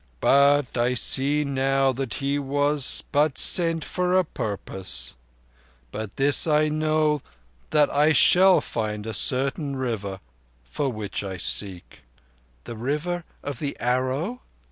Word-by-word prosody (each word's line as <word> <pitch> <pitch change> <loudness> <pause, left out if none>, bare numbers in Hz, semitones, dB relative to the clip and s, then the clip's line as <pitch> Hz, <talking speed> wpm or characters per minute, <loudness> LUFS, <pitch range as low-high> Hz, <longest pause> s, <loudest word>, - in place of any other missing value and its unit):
"But 140 - +3
I 120 +1 +1
see 140 +5 +2
now 135 0 +1
that 130 -2 -5
he 140 +1 -2
was 145 0 +1
but 150 -1 +1
sent 165 -3 +3
for 180 0 0
a 185 - +3
purpose. 100 -7 -3 0.8
By 110 +1 -5
this 140 +4 +4
I 155 0 +2
know 155 -1 0 0.5
that 150 -1 +3
I 150 +2 +3
shall 185 +4 +5
find 105 -2 -4
a 110 - -5
certain 135 +5 0
River 110 -7 -4 0.4
for 135 - -3
which 105 -3 -5
I 95 -2 -6
seek." 90 0 -5 0.6
"The 120 - -8
River 150 +9 -3 0.2
of 140 -3 -6
the 140 -2 -4
Arrow?" 130 - -2
140 Hz, 130 wpm, -24 LUFS, 120-150 Hz, 0.8 s, shall